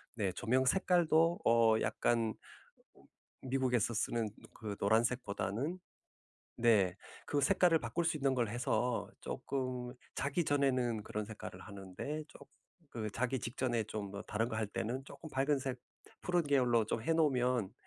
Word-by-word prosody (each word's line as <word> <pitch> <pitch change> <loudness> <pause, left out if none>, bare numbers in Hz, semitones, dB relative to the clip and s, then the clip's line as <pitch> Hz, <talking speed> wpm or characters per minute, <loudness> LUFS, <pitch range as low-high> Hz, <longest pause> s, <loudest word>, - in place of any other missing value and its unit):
네 100 -5 0
조명 130 +6 +1
색깔도 170 0 +3
어 115 -1 +5
약간 115 -2 +1 1.1
미국에서 130 -3 +1
쓰는 115 0 0 0.2
그 105 -2 -5
노란색보다는 115 - 0 0.8
네. 105 -6 +4 0.3
그 145 - +1
색깔을 175 +2 +4
바꿀 170 +3 -2
수 165 -1 +1
있는 135 -2 +2
걸 120 -3 +1
해서 120 +1 0
쪼끔 130 -2 -3 0.2
자기 145 +5 0
전에는 130 -6 +1
그런 105 +1 -4
색깔을 110 0 -8
하는데 100 +10 -6
쪼 - - -14 0.5
그 110 -2 -3
자기 125 +3 0
직전에 120 -1 -1
좀 105 -2 -5 0.2
다른 110 +2 0
거 110 - -3
할 110 -1 0
때는 120 +6 -3
쪼끔 140 +3 -10
밝은색 135 -2 0 0.4
푸른 175 -1 +2
계열로 125 -6 +3
좀 110 - -1
해 165 - +2
놓으면 125 -9 +2
125 Hz, 265 characters per minute, -34 LUFS, 110-140 Hz, 1.1 s, 어